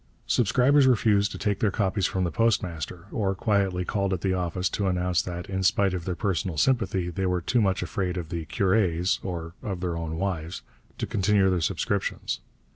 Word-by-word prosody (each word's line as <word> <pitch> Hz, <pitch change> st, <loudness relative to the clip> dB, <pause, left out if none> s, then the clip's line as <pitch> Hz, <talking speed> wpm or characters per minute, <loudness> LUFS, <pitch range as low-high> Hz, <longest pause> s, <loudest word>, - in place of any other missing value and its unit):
Subscribers 130 Hz, +5 st, +4 dB
refused 105 Hz, -4 st, +3 dB
to -, -, -6 dB
take 105 Hz, -2 st, -1 dB
their 110 Hz, -, +2 dB
copies 95 Hz, -2 st, 0 dB
from 95 Hz, -, -1 dB
the 85 Hz, -, -1 dB
postmaster, 90 Hz, -4 st, -1 dB
or 95 Hz, -3 st, 0 dB
quietly 95 Hz, -3 st, +1 dB
called 100 Hz, -1 st, 0 dB
at 90 Hz, -, -2 dB
the 95 Hz, -1 st, +1 dB
office 90 Hz, 0 st, -1 dB
to 100 Hz, +1 st, -1 dB
announce 90 Hz, -1 st, +1 dB
that, 90 Hz, -1 st, -6 dB
in 95 Hz, 0 st, -2 dB
spite 95 Hz, +1 st, +3 dB
of 90 Hz, -3 st, -4 dB
their 90 Hz, -, -2 dB
personal 90 Hz, -3 st, -1 dB
sympathy, 95 Hz, -, +1 dB
they 95 Hz, +2 st, -1 dB
were 90 Hz, 0 st, +1 dB
too 115 Hz, +8 st, +1 dB
much 95 Hz, -2 st, +1 dB
afraid 90 Hz, -2 st, -2 dB
of 85 Hz, -3 st, -5 dB
the 85 Hz, -2 st, -4 dB
curés 95 Hz, -3 st, +1 dB
or 85 Hz, -3 st, -5 dB
of 95 Hz, -4 st, -4 dB
their 90 Hz, -2 st, -2 dB
own 80 Hz, -1 st, -4 dB
wives 90 Hz, -2 st, -3 dB, 0.3 s
to -, -, -2 dB
continue 100 Hz, -1 st, +2 dB
their 90 Hz, -2 st, 0 dB
subscriptions. 95 Hz, +4 st, -1 dB
95 Hz, 195 wpm, -26 LUFS, 90-100 Hz, 0.3 s, Subscribers